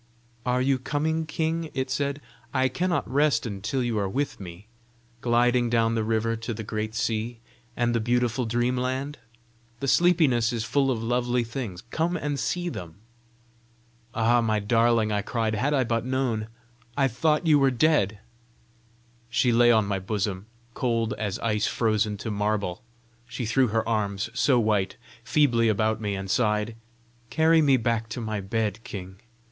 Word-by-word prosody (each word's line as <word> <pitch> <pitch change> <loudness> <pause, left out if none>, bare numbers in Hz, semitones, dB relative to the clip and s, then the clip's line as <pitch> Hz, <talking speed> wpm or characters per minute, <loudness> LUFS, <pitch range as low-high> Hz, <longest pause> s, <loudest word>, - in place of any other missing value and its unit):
"Are 125 +1 +2
you 135 0 +2
coming, 155 +4 -1
king?" 160 +1 -2
it 130 0 -2
said. 140 +1 -1 0.3
"I 130 0 +3
cannot 175 +6 -1
rest 140 -3 +2
until 110 +5 -2
you 115 -3 -1
are 100 -1 -1
with 140 +8 -2
me, 90 +1 -10 0.6
gliding 120 0 +2
down 115 -1 +2
the 115 -1 0
river 115 +1 0
to 115 0 -5
the 110 - -5
great 110 +1 -4
sea, 115 +1 -2 0.4
and 120 0 +1
the 115 - +1
beautiful 120 +1 0
dream 120 +2 +1
land. 130 +3 -2 0.6
The 135 - -3
sleepiness 145 -8 +3
is 115 -2 -2
full 135 +3 +1
of 115 -4 -1
lovely 120 +1 +1
things: 115 -6 -6
come 170 +2 0
and 145 -2 -2
see 175 +6 -1
them." 85 - -6 1.2
"Ah, 120 +1 +3
my 110 -2 +1
darling!" 115 +1 +2
I 105 -1 +1
cried. 110 +1 -1
"Had 130 +7 0
I 130 - +3
but 115 -1 -1
known! 125 -4 -1 0.5
I 135 -1 +4
thought 150 +7 +1
you 150 -3 +5
were 135 -1 +4
dead!" 125 -6 +2 1.1
She 120 +1 +2
lay 120 +1 +5
on 110 -2 +4
my 100 -1 -1
bosom 100 0 -3 0.3
cold 115 -4 0
as 105 -2 -2
ice 105 -2 +1
frozen 110 -2 0
to 110 +2 -5
marble. 105 -3 -1 0.5
She 120 0 -4
threw 125 +4 +3
her 110 +1 -1
arms, 105 -1 -1
so 125 -1 +3
white, 105 -4 0 0.3
feebly 120 -4 +3
about 110 +1 +1
me, 105 -2 -2
and 95 0 -5
sighed 105 +1 0 0.5
"Carry 160 0 +4
me 140 -3 +4
back 115 -1 -1
to 115 - -5
my 110 -2 -3
bed, 110 +1 -2
king. 95 -5 -8
115 Hz, 165 wpm, -26 LUFS, 110-130 Hz, 1.2 s, you